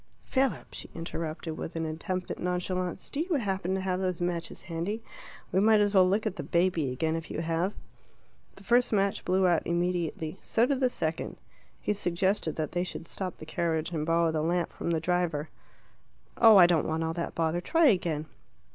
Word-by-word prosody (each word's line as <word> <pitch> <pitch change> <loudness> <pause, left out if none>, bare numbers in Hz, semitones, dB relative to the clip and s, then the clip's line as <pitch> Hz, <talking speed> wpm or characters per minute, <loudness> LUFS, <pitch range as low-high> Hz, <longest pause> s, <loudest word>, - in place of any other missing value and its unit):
"Philip," 260 - 0
she - - -7
interrupted, 165 -1 -4
with 165 - -5
an 165 0 -1
attempt 175 +4 -3
at - - -5
nonchalance, 180 0 -2
"do 285 - -3
you 340 +1 0
happen 190 -6 -1
to 190 - -1
have 185 -1 -1
those 185 -2 -1
matches 175 -1 -3
handy? 175 +7 -3 0.5
We 185 - +3
might 215 +1 +5
as 205 0 +2
well 185 -2 +6
look 205 +3 +1
at 190 - -2
the - - -2
baby 170 -6 +1
again 160 +5 0
if 165 0 -5
you - - -3
have." 165 +3 0 0.8
The 195 - -14
first 240 +5 +3
match 200 -2 +1
blew 185 +1 +2
out 175 -3 +3
immediately. 170 -1 -1
So 230 - +2
did 270 0 0
the 255 -2 +3
second. 160 -7 -3 0.4
He - - 0
suggested 185 -3 0
that 155 -2 -2
they 175 0 0
should 180 - -5
stop 185 0 -4
the - - -9
carriage 160 0 -1
and 155 -3 -2
borrow 165 +1 +2
the 155 -1 0
lamp 175 +2 0
from - - -4
the 165 -1 +1
driver. 165 -3 0 0.9
"Oh, 225 -3 +8
I 180 - +9
don't 170 -3 +2
want 160 +1 -1
all 160 0 -1
that 170 0 -4
bother. 165 +1 0
Try 325 - +3
again." 170 -7 0
175 Hz, 200 wpm, -29 LUFS, 165-190 Hz, 0.9 s, I